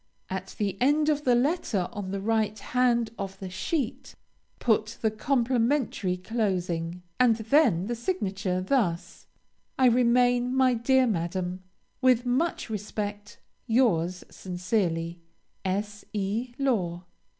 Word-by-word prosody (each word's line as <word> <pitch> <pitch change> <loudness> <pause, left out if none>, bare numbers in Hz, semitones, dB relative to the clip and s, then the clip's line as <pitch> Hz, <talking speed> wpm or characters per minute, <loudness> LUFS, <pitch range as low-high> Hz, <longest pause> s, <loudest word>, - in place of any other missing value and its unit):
At 190 0 -5
the 200 -1 -2
end 295 +4 +3
of 295 -1 0
the 250 -2 +5
letter, 245 - +1
on 205 -4 -5
the 195 +1 -3
right 215 0 0
hand 235 0 +1
of 195 -1 -5
the 190 -1 -7
sheet, 250 - -3 0.4
put 220 -1 +1
the 220 - +2
complimentary 240 -4 +1
closing, 180 -5 -2 0.2
and 245 -3 +5
then 220 - +3
the 240 - -2
signature; 195 - -2
thus 185 -6 -1 0.5
I 260 - +4
remain, 245 +1 +3
my 260 -1 +4
dear 255 +3 +3
Madam, 180 -2 -2 0.4
With 255 -2 +4
much 265 +8 0
respect, 210 -1 -5 0.3
Yours 185 -8 +2
sincerely, 175 -2 -2 0.4
S. 205 +2 -2
E. 215 +5 -2
LAW. 185 -11 0
220 Hz, 120 wpm, -27 LUFS, 185-250 Hz, 0.5 s, the